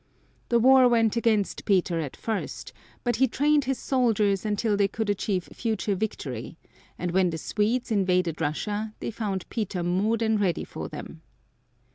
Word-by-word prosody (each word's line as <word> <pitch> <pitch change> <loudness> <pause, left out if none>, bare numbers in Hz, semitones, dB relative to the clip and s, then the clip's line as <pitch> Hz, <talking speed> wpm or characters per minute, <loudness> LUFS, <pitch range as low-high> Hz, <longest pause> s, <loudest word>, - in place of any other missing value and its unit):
The 235 - +4
war 260 +2 +7
went 225 -2 +3
against 220 -4 +1
Peter 180 -4 +2
at 150 -5 -5
first, 220 -2 -4 0.3
but 240 -2 0
he 265 +2 +4
trained 290 +3 +2
his 265 0 -1
soldiers 215 -6 +1
until 210 0 +1
they 200 -1 +3
could 215 +1 -2
achieve 195 -2 -1
future 220 -3 -1
victory, 165 - -4 0.4
and 180 -1 -2
when 185 0 +3
the 165 - -3
Swedes 225 +9 -1
invaded 180 -5 +1
Russia 210 +8 -2
they - - -4
found 205 -4 -3
Peter 195 -6 -2
more 190 +6 +1
than 220 -1 +1
ready 185 -5 0
for - - -7
them. - - -9
210 Hz, 160 wpm, -26 LUFS, 185-230 Hz, 0.4 s, war